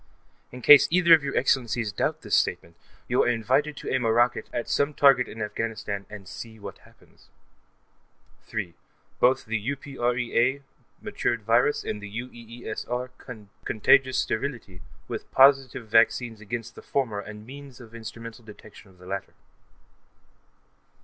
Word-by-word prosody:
In 125 0 -10
case 145 -2 +9
either 170 -1 +5
of 160 -3 +6
your 140 - -2
Excellencies 120 -4 +1
doubt - - -2
this - - +1
statement, 85 0 0 0.3
you - - +2
are - - +2
invited 130 +6 +1
to - - -6
aim 130 -1 +1
a 115 - +2
rocket 120 +2 +1
at 120 - -3
some 145 +1 0
target 135 -3 +5
in 110 0 -6
Afghanistan 105 -2 -4
and 105 -3 -10
see 110 +3 -9
what 105 - -10
happens. - - -23 1.2
3.) 100 -6 -4 0.5
Both 130 +2 +3
the 110 0 -2
UPREA 125 0 -1 0.4
mutated 120 -2 -2
virus 115 +6 +2
and 105 - -4
the 105 - -8
UEESR 120 +1 -6 0.5
contagious 130 +4 +3
sterility, 110 -7 -3 0.3
with - - -7
positive 135 -3 +4
vaccines 115 0 +2
against 115 +2 -6
the - - -12
former 120 -7 -2
and 105 +1 -9
means 135 0 -11
of 115 -2 -14
instrumental 115 0 -9
detection 105 -1 -14
of 95 - -21
the 90 - -16
latter. 95 +1 -5
120 Hz, 145 wpm, -26 LUFS, 110-130 Hz, 1.2 s, case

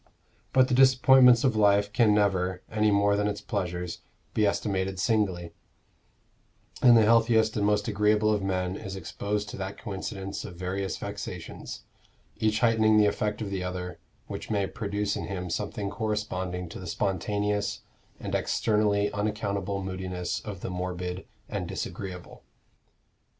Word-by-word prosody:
But 130 -1 +5
the - - -1
disappointments 130 -1 +6
of 130 -5 +2
life 100 -1 +3
can 115 -2 +4
never, 95 -3 +1
any 110 0 +2
more 100 0 +3
than 105 0 +1
its 105 0 -2
pleasures, 90 -3 -3 0.3
be 105 -1 +3
estimated 95 -2 -1
singly; 95 -6 0 1.3
and 120 -1 +8
the 110 - +6
healthiest 115 -1 +4
and 105 -2 +1
most 105 +1 +1
agreeable 105 0 +3
of 105 - 0
men 90 -1 -1
is 95 -1 -6
exposed 100 +4 -3
to - - -7
that 95 0 -5
coincidence 95 0 -5
of 90 - -8
various 95 +1 -3
vexations, - - -7 0.5
each 110 0 +1
heightening 110 -2 +4
the 105 - +6
effect 105 +1 -1
of 100 - -5
the 95 -2 -2
other, 90 -1 -5 0.3
which - - -7
may 100 -2 +1
produce 105 0 -2
in - - -4
him 90 -3 -4
something 105 +1 -3
corresponding 95 -4 -3
to - - -8
the 90 - -8
spontaneous 100 +3 -1 0.4
and - - -5
externally 105 -2 +1
unaccountable 100 -2 -2
moodiness 95 -1 -3
of 100 -4 -8
the - - -4
morbid 90 0 -4 0.2
and - - -4
disagreeable. 90 -3 -6
100 Hz, 145 wpm, -27 LUFS, 95-105 Hz, 1.3 s, and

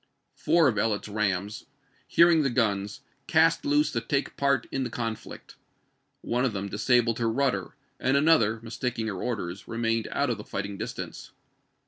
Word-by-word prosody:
Four 170 -3 +3
of 110 -6 +1
Ellet's 105 -1 0
rams, 100 -1 -2 0.4
hearing 170 -1 +5
the 140 - +1
guns, 105 -1 -1 0.3
cast 160 0 +3
loose 145 +1 +2
to 115 - -1
take 140 +4 -2
part 140 0 +1
in 135 - -1
the 125 - -3
conflict. 115 -2 -6 0.6
One 125 +1 -1
of 130 -5 0
them 100 0 -4
disabled 115 +2 +2
her 115 -1 +1
rudder, 135 +3 -1 0.2
and 135 +2 +2
another, 140 -8 +3
mistaking 115 0 -3
her 100 -4 -4
orders, 100 -6 -4
remained 115 -1 -1
out 140 -3 0
of 105 -3 -6
fighting 100 +1 -4
distance. - - -6
115 Hz, 155 wpm, -27 LUFS, 105-135 Hz, 0.6 s, hearing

